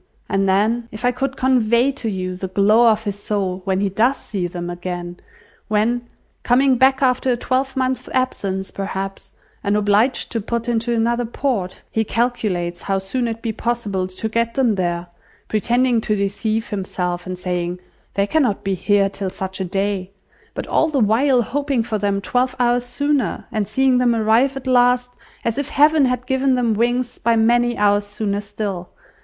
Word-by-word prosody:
And 195 0 +1
then, 225 +5 +1
if 215 +3 -5
I 245 - +4
could 270 +2 -3
convey 250 0 +3
to 250 -4 -4
you 185 -2 -3
the 190 +1 -4
glow 210 +5 +4
of 220 0 +1
his 205 -2 -4
soul 190 -3 -2
when 190 -1 0
he 200 - +1
does 235 +8 +2
see 190 -5 -3
them 175 0 -6
again; 175 0 -5 0.5
when, 235 +3 0 0.3
coming 260 +1 +3
back 265 +1 +4
after 255 0 +2
a - - -2
twelvemonth's 260 +1 -1
absence, 195 -7 -2
perhaps, 195 0 -5 0.3
and 200 +1 +1
obliged 210 +5 +2
to 230 - -1
put 235 +3 -3
into 235 0 0
another 235 +1 +1
port, 225 -6 -2
he 220 - +1
calculates 205 -7 -1
how 195 -1 -1
soon 235 +6 -2
it 230 0 -5
be 230 - -1
possible 210 -5 -2
to 185 +4 -5
get 230 +1 -1
them 255 -5 +3
there, 175 -2 -1 0.4
pretending 240 +2 +2
to 215 - 0
deceive 215 +3 -1
himself, 180 -3 -3
and 185 0 -4
saying, 180 -1 -3 0.4
'They 200 - +2
cannot 245 -3 +1
be 195 - 0
here 200 +1 +2
till 195 -1 -4
such 190 +1 -6
a - - -1
day,' 195 0 -2 0.5
but - - -4
all 320 - +2
the 300 -3 0
while 245 +4 +3
hoping 275 -1 -1
for 220 -2 -2
them 200 -1 0
twelve 250 +5 0
hours 245 0 +2
sooner, 285 +2 -1
and 215 -2 -1
seeing 265 -1 +2
them 240 -2 +3
arrive 230 +5 +2
at 270 - -8
last, 245 -1 +3 0.3
as 230 +3 0
if 285 0 -3
Heaven 300 0 +4
had 250 -1 -1
given 265 0 +2
them 240 -3 +1
wings, 240 +3 0
by 230 +1 +2
many 240 +2 +3
hours 205 0 +3
sooner 205 -1 -2
still! 200 -3 -5
225 Hz, 180 wpm, -20 LUFS, 195-245 Hz, 0.5 s, I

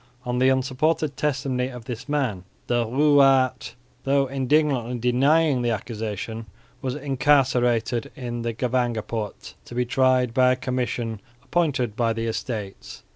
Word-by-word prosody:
On 125 0 -1
the 130 +1 +4
unsupported 135 +3 0
testimony 135 -3 -1
of 125 -3 -10
this 125 +2 -7
man, 130 -11 -1 0.2
the 120 -1 0
Ruwaard, 135 -1 +3 0.3
though 140 0 +2
indignantly 135 -2 +1
denying 135 +4 +3
the 120 - 0
accusation, 110 0 -4 0.3
was 130 0 -3
incarcerated 125 -4 +1
in 120 -2 -5
the 115 0 -2
Gevangenpoort, 115 -3 -2
to 120 - -11
be 125 0 +1
tried 130 -1 +2
by 125 +1 +4
a - - -1
commission 125 -4 -3 0.2
appointed 130 -7 0
by 115 -1 +1
the 115 0 -3
Estates. 110 -3 -5
125 Hz, 130 wpm, -24 LUFS, 115-135 Hz, 0.3 s, the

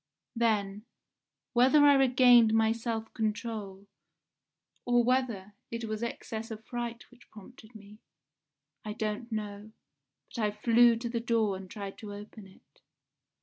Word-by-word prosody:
Then, 210 -2 -1 0.7
whether 265 +5 +5
I 285 - +7
regained 245 -4 +5
my 220 0 +3
self 225 -1 -4
control, 215 -3 -4 1.0
or 245 -1 +3
whether 235 -6 -1 0.2
it 230 0 -5
was 215 0 -4
excess 225 -1 -5
of 220 -1 -8
fright 240 -1 -6
which 245 0 -21
prompted 220 +2 -15
me, 210 0 -14 0.8
I 210 - -5
don't 215 +2 -4
know, 210 0 -6 0.6
but 235 - -3
I 210 - +2
flew 230 +3 +4
to 235 +1 -5
the 235 0 -2
door 225 -4 0
and 190 0 -9
tried 200 -3 -8
to 205 -2 -8
open 210 0 -11
it. 145 -7 -24
225 Hz, 140 wpm, -29 LUFS, 210-235 Hz, 1.0 s, I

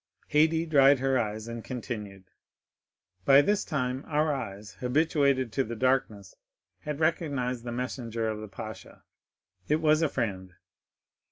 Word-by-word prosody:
Haydée 160 +2 +3
dried 140 -2 +6
her 135 0 +1
eyes, 110 -1 -3
and 115 -1 -6
continued: 105 -6 -6 1.0
"By 140 +6 +7
this 205 +3 +1
time 130 -3 -2
our 150 0 +1
eyes, 105 -6 -6
habituated 140 -2 +1
to 135 - +1
the 115 -1 -6
darkness, 110 -6 0 0.5
had 150 -1 -5
recognized 140 -7 -1
the 120 - -4
messenger 120 -2 -3
of 110 -1 -3
the 110 - -7
pasha,—it 100 0 -8
was 155 0 +3
a 160 - +2
friend. 95 -8 -3
125 Hz, 135 wpm, -28 LUFS, 110-145 Hz, 1.0 s, By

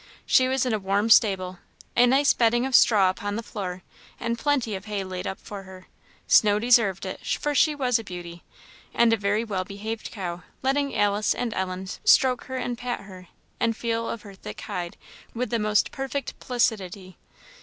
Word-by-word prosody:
She 255 - +4
was 265 0 +1
in 250 - 0
a 215 - 0
warm 200 +3 0
stable, 185 -5 +4 0.4
a 245 +1 +6
nice 275 +3 +4
bedding 240 +1 +2
of 265 - -4
straw 200 -6 +6
upon 205 +1 -5
the 230 - -4
floor, 185 -5 -6 0.4
and 235 0 -1
plenty 250 -3 0
of 190 +1 -6
hay 205 -2 -3
laid 185 -1 -5
up 190 - -4
for 205 -1 -8
her. 185 -1 -13 0.4
Snow 205 -1 +5
deserved 220 -5 +3
it, 185 - -6
for 295 - -1
she 300 +2 +3
was 250 -4 +1
a - - -7
beauty, 175 -3 -9 0.5
and 235 -1 +4
a - - +5
very 205 +1 0
well 195 -5 -2
behaved 215 +3 -6
cow, 175 -4 -5 0.2
letting 280 +1 0
Alice 205 +1 +2
and 235 -3 -2
Ellen 185 0 -3 0.2
stroke 255 -2 +4
her 260 - -5
and 245 -1 -3
pat 245 0 -3
her, 185 -2 -12 0.3
and 230 -1 0
feel 230 -1 -2
of 230 - -5
her 200 -2 -11
thick 190 - -9
hide, 175 -1 -5 0.4
with 245 -1 -2
the 235 - +1
most 210 -1 +2
perfect 270 0 -4
placidity. 195 - -2
215 Hz, 190 wpm, -25 LUFS, 190-245 Hz, 0.5 s, a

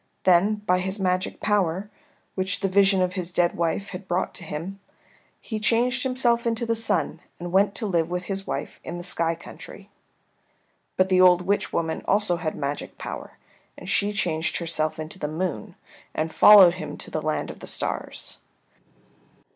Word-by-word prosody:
Then 190 +4 +4
by 180 -1 +3
his 190 +3 -2
magic 185 -1 -1
power, 195 -2 0 0.5
which 190 0 -2
the 195 - +1
vision 195 0 +4
of 180 0 -1
his 185 -2 -3
dead 175 -1 +1
wife 170 +4 -1
had 185 0 -8
brought 180 +1 -1
to - - -5
him, 170 +5 -6 0.6
he 220 -2 -5
changed 245 +4 +1
himself 245 -2 +2
into 230 0 0
the 230 0 0
Sun, 225 -7 +1 0.2
and 175 0 -6
went 200 +2 +3
to 225 - -2
live 170 -5 0
with 180 0 -3
his 195 +1 -4
wife - - -4
in 175 - -6
the 175 - -7
sky 170 -2 0
country. 165 - -12 1.1
But 185 0 +3
the 185 -1 +4
old 180 -1 +6
witch 200 +3 0
woman 160 -1 -2
also 200 -3 +2
had 160 -2 -3
magic 140 0 -4
power, - - -7 0.4
and - - -10
she 205 +1 +1
changed 165 -6 -1
herself 155 -2 -1
into 155 +4 -6
the 150 - -2
Moon 155 - -4 0.4
and 160 +1 -2
followed 195 -5 +8
him - - -6
to - - -5
the - - -2
land - - -2
of - - -13
the - - -9
stars. - - -3
185 Hz, 180 wpm, -25 LUFS, 170-200 Hz, 1.1 s, followed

